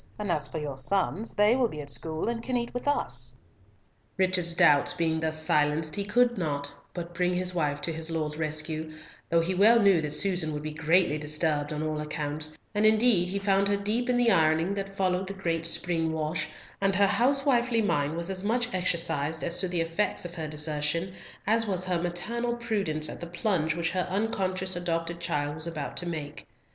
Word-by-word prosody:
And 210 -3 -2
for 150 +2 -1
your 145 -3 -4
sons, 195 - +3
they 210 +3 +5
will 255 -2 +2
be 150 - -8
at 140 -1 -1
school, 160 +4 -1
and 235 0 -2
can 255 +1 -1
eat 235 0 -3
with 245 +3 -4
us." 125 - +2 0.8
Richard's 185 -3 +1
doubts 165 -3 +4
being 165 -2 0
thus 155 0 -1
silenced 150 0 +1
he 200 - -1
could 240 +2 +2
not 145 -4 -2 0.2
but 175 -1 -6
bring 180 +1 0
his 180 0 -1
wife 145 -4 -1
to 165 +3 -2
his 160 +1 -5
lord's 155 -2 -2
rescue, 155 0 -3 0.3
though 165 0 +3
he 175 +3 -1
well 215 +5 +6
knew 195 -6 +4
that 150 -1 -3
Susan 180 -4 +1
would 150 0 -5
be 155 - -4
greatly 160 0 +2
disturbed 150 -1 0
on 150 0 -3
all 155 -1 -2
accounts, 150 0 -4 0.2
and 210 0 +1
indeed 215 -4 +4
he 195 - -2
found 195 0 +2
her 200 0 +1
deep 220 +5 -1
in 250 - +3
the 240 -2 +4
ironing 160 +1 +3
that 195 0 -5
followed 185 0 0
the 195 - -5
great 165 -3 -1
spring 165 -1 0
wash, 155 +1 -2 0.3
and 195 -1 +2
her 200 +1 +5
housewifely 245 0 +2
mind 145 -6 0
was 170 +3 -3
as 190 0 -3
much 240 +3 0
exercised 160 -4 -1
as 170 - 0
to 185 - +1
the 175 -1 -1
effects 165 +4 -1
of 175 - -6
her 160 -3 -4
desertion, 150 +3 -1 0.3
as 225 +2 +2
was 185 -2 0
her 180 -2 0
maternal 235 +8 -2
prudence 200 -10 -1
at - - -8
the 170 - -5
plunge 170 -3 0
which 170 0 -1
her 180 -1 -1
unconscious 190 -2 -1
adopted 170 -1 -2
child 150 -4 -2
was 155 +2 -4
about 155 -4 -5
to 175 - -4
make. 150 -3 -6
170 Hz, 200 wpm, -28 LUFS, 155-200 Hz, 0.8 s, well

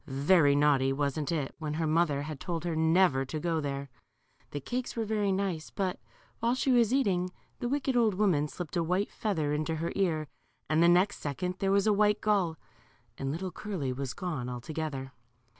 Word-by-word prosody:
Very 145 +2 +4
naughty, 140 -2 +3
wasn't 145 +2 -1
it, 150 -5 -2
when 150 -2 -3
her 160 +1 0
mother 155 -3 +2
had 150 -2 -6
told 170 -2 -3
her 170 -2 -1
never 160 -3 +3
to 155 +4 -4
go 165 0 0
there. 140 -2 -4 0.6
The 145 - -4
cakes 245 - -4
were 225 -1 -1
very 210 -2 0
nice, 190 -5 -2
but 190 -2 -2 0.4
while 235 +2 +1
she 265 +1 +1
was 240 -3 +4
eating, 195 -9 +2 0.3
the 240 - -2
wicked 275 -1 0
old 225 -5 +3
woman 180 -8 +2
slipped 150 +5 -7
a 170 - +2
white 180 +5 0
feather 160 -9 -1
into 155 +2 -1
her 165 +2 -2
ear, 160 -6 0 0.4
and 155 +1 +2
the 170 - +6
next 185 +4 +4
second 180 +6 -3
there 195 0 +1
was 200 0 +3
a 215 - +4
white 210 0 +3
gull, 190 -7 +1 0.6
and 135 0 -2
little 180 +4 -4
Curly 175 -13 -3
was 130 -1 -4
gone 155 -9 -3
altogether. 135 +1 -4
165 Hz, 190 wpm, -30 LUFS, 145-195 Hz, 0.6 s, the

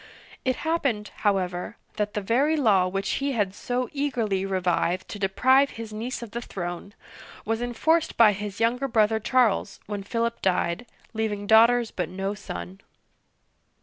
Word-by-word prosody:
It 255 -1 +1
happened, 275 -11 0
however, 185 -3 -1 0.2
that 210 -1 -2
the 210 - 0
very 270 +10 +2
law 205 -9 +4
which 195 +1 -2
he 280 0 0
had 205 -5 0
so 245 +4 -2
eagerly 230 -9 -1
revived 185 -1 0
to 205 - -6
de 195 -1 +1
prive 260 +7 +4
his 225 -1 -7
niece 235 +3 -4
of 225 - -9
the 235 - -4
throne, 175 0 -6 0.5
was 225 +1 -1
enforced 315 +7 +1
by 225 -3 +7
his 205 0 -6
younger 245 +4 +1
brother 220 -2 +2
Charles 220 -4 +1
when 205 -1 -4
Philip 230 +3 -2
died, 180 +4 0 0.3
leaving 215 -2 -2
daughters 230 +2 +5
but 180 - -3
no 195 +2 -3
son. 90 - -7
215 Hz, 155 wpm, -25 LUFS, 195-245 Hz, 0.5 s, by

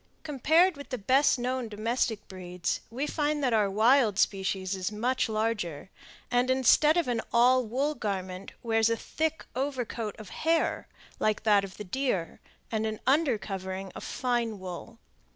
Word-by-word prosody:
Compared 315 +4 +3
with 285 - -10
the 255 - -3
best 260 +6 +3
known 250 -1 -2
domestic 220 0 -1
breeds, 180 -2 -4
we 255 +6 -3
find 300 -1 -1
that 250 -3 +2
our 210 -3 +3
wild 220 +1 +4
species 195 -1 0
is 185 +1 -3
much 245 +4 0
larger, 210 -7 -2 0.4
and, 245 +1 +2
instead 265 +5 +5
of 345 - +1
an 235 -2 0
all 250 +2 +5
wool 265 +7 -1
garment, 190 -6 -4
wears 225 -1 +2
a 230 - +1
thick 320 +5 -2
over 265 -1 -1
coat 220 -2 -5
of 215 -4 -10
hair 325 - 0 0.3
like 215 -1 0
that 205 -2 +4
of 190 -1 -8
the - - -6
deer, 195 -5 -2 0.3
and 220 -1 0
an 215 -1 -4
under 270 -2 +3
covering 190 -1 -5
of - - -8
fine 240 -4 -1
wool. 185 +5 -8
230 Hz, 165 wpm, -28 LUFS, 200-260 Hz, 0.4 s, instead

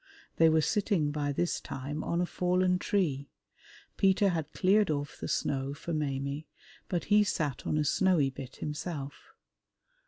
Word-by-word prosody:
They 165 0 +6
were 160 0 +4
sitting 200 -6 +1
by 145 -1 -1
this 175 +5 -1
time 140 +3 -5
on 170 +1 0
a - - +2
fallen 180 +1 +1
tree; 150 -10 0 0.7
Peter 195 +1 +4
had 160 -4 -2
cleared 200 +3 +3
off 145 -2 -3
the - - -4
snow 135 0 -1
for 170 +3 -5
Maimie, 140 0 -2 0.4
but 175 -2 -1
he 210 0 +7
sat 150 -9 -2
on - - +1
a 150 - +1
snowy 165 -6 +3
bit 130 -1 -9
himself. 150 -2 -6
155 Hz, 155 wpm, -30 LUFS, 145-180 Hz, 0.7 s, he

